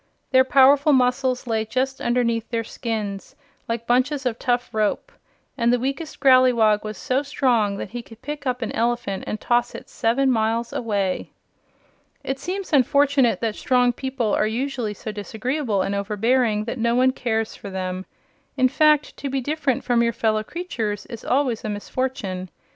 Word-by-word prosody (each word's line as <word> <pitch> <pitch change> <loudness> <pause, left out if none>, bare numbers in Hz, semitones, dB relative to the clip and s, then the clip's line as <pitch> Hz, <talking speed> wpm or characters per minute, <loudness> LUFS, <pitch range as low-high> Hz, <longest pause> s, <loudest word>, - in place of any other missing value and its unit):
Their 260 -1 +6
powerful 275 +2 +5
muscles 255 0 +1
lay 225 -2 0
just 260 +4 -2
underneath 235 -2 0
their 230 -1 -1
skins, 210 -4 -5 0.3
like 230 0 -2
bunches 265 +4 +1
of 240 -2 -1
tough 245 0 -1
rope, 215 -1 -1 0.5
and 235 0 +3
the 245 - +3
weakest 275 +6 -4
Growleywog 250 -6 +5
was 215 -1 -6
so 260 +2 0
strong 245 -8 +1
that 200 - -6
he 240 +1 -5
could 225 -1 -16
pick 295 -1 -5
up 250 -1 -1
an 225 - -3
elephant 235 -4 -1
and 215 - -3
toss 240 +1 +1
it - - -10
seven 260 +4 +1
miles 230 0 0
away. 200 -5 -1 0.9
It 270 0 -3
seems 375 0 -5
unfortunate 280 -1 +3
that 225 -2 0
strong 250 -1 +2
people 255 -4 -2
are 215 - +2
usually 235 -2 -2
so 215 - -6
disagreeable 220 +1 -2
and 200 - -2
overbearing 210 +2 +1
that 235 +3 -5
no 235 +1 +1
one 255 +1 +4
cares 225 -4 -2
for 200 - -9
them. 185 0 -4 0.5
In 255 -1 +4
fact, 300 +1 +3
to 280 - -4
be 270 0 -1
different 285 -1 -1
from 240 -2 +2
your 235 0 +1
fellow 220 -1 +1
creatures 225 - -4
is 235 -3 -9
always 255 -4 0
a 215 - -3
misfortune. 205 -4 -3
240 Hz, 170 wpm, -23 LUFS, 220-265 Hz, 0.9 s, Their